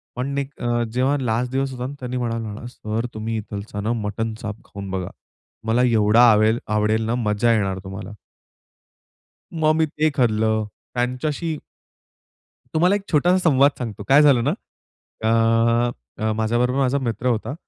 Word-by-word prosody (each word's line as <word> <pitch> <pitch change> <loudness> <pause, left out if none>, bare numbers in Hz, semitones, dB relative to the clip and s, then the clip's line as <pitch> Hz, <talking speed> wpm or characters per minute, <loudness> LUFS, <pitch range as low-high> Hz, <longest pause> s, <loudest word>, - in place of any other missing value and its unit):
पण 140 +3 -3
एक 140 0 -3
अ, 120 0 0
जेव्हा 130 +3 +2
लास्ट 125 +2 -1
दिवस 135 0 -1
होता 125 -1 -5
ना, 140 - -7
त्यांनी 125 0 -4
म्हणाला 115 -2 -2
मला, 120 - -9
"सर, 115 -1 -4
तुम्ही 110 +1 -3
इथला 105 -1 -6
ना 115 +3 0
मटन 110 +2 -2
चाप 105 -1 -5
खाऊन 100 -1 -8
बघा, 95 -2 -3
तुम्हाला 115 +3 -4
एवढा 110 0 +4
आवेल 110 +2 +3 0.2
आवडेल 110 +1 +1
ना, 115 +2 0
मजा 105 +3 +3
येणार 95 -3 0
तुम्हाला." 95 +2 -7 1.4
मग 155 -2 +2
मी 160 0 +3
ते 155 +1 0
खाल्लं. 110 -4 +2 0.3
त्यांच्याशी 140 +6 -2 1.2
तुम्हाला 180 +5 +3
एक 205 - -2
छोटासा 175 +4 +4
संवाद 140 +1 +5
सांगतो. 110 -4 -5
काय 140 +2 +7
झालं 135 -5 +5
ना, - - +1 0.7
अ, 115 +1 +3 0.3
अ, 110 - +1
माझ्याबरोबर 120 +4 +1
माझा 135 0 +2
मित्र 120 0 -2
होता, 115 +1 0
120 Hz, 155 wpm, -22 LUFS, 110-135 Hz, 1.4 s, काय